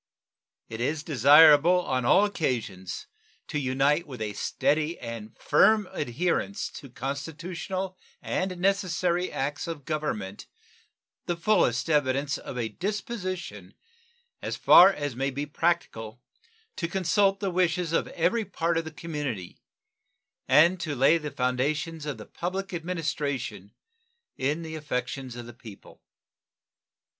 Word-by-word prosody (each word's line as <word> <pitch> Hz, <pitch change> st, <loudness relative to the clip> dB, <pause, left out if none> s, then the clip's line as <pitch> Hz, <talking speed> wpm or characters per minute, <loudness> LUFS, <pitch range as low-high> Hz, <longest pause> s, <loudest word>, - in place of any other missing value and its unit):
It 115 Hz, +1 st, -6 dB
is 145 Hz, +4 st, -1 dB
desirable 150 Hz, +5 st, +7 dB
on 130 Hz, -2 st, -1 dB
all 195 Hz, +11 st, +5 dB
occasions 115 Hz, -, -3 dB, 0.4 s
to 150 Hz, -, -2 dB
unite 140 Hz, +4 st, +1 dB
with 130 Hz, -4 st, -8 dB
a 105 Hz, -1 st, -3 dB
steady 155 Hz, +9 st, 0 dB
and 115 Hz, -2 st, -8 dB
firm 215 Hz, -3 st, +4 dB
adherence 170 Hz, -, -2 dB
to 140 Hz, -, -10 dB
constitutional 170 Hz, +8 st, -5 dB, 0.2 s
and 185 Hz, -1 st, -2 dB
necessary 180 Hz, -2 st, 0 dB
acts 145 Hz, +3 st, -3 dB
of 155 Hz, -5 st, -6 dB
Government 110 Hz, -11 st, -3 dB, 0.8 s
the 175 Hz, -1 st, -1 dB
fullest 170 Hz, -, +2 dB
evidence 140 Hz, -2 st, +1 dB
of 125 Hz, -, -8 dB
a 120 Hz, -2 st, -1 dB
disposition 185 Hz, -, -5 dB, 0.7 s
as -, -, -3 dB
far 185 Hz, +3 st, +8 dB
as 145 Hz, -8 st, -4 dB
may 135 Hz, +2 st, -1 dB
be 140 Hz, +2 st, -4 dB
practicable 145 Hz, -8 st, -2 dB, 0.6 s
to 170 Hz, -, -1 dB
consult 195 Hz, +2 st, +2 dB
the 195 Hz, -2 st, -1 dB
wishes 175 Hz, -2 st, +1 dB
of -, -, +1 dB
every 225 Hz, +7 st, 0 dB
part 165 Hz, -4 st, -1 dB
of 165 Hz, -, -5 dB
the -, -, -5 dB
community 145 Hz, -, -5 dB, 0.9 s
and 170 Hz, +4 st, +5 dB
to 155 Hz, -4 st, -3 dB
lay 140 Hz, +6 st, +4 dB
the 150 Hz, -1 st, -5 dB
foundations 145 Hz, +5 st, -1 dB
of 140 Hz, -5 st, -3 dB
the 105 Hz, -, -9 dB
public 190 Hz, +2 st, -4 dB
administration 145 Hz, -, -3 dB, 0.6 s
in 145 Hz, +5 st, -1 dB
the 160 Hz, -1 st, -7 dB
affections 130 Hz, -4 st, -4 dB
of 120 Hz, -1 st, -7 dB
the 120 Hz, -, -10 dB
people. 110 Hz, -4 st, -14 dB
150 Hz, 130 wpm, -27 LUFS, 130-175 Hz, 0.9 s, far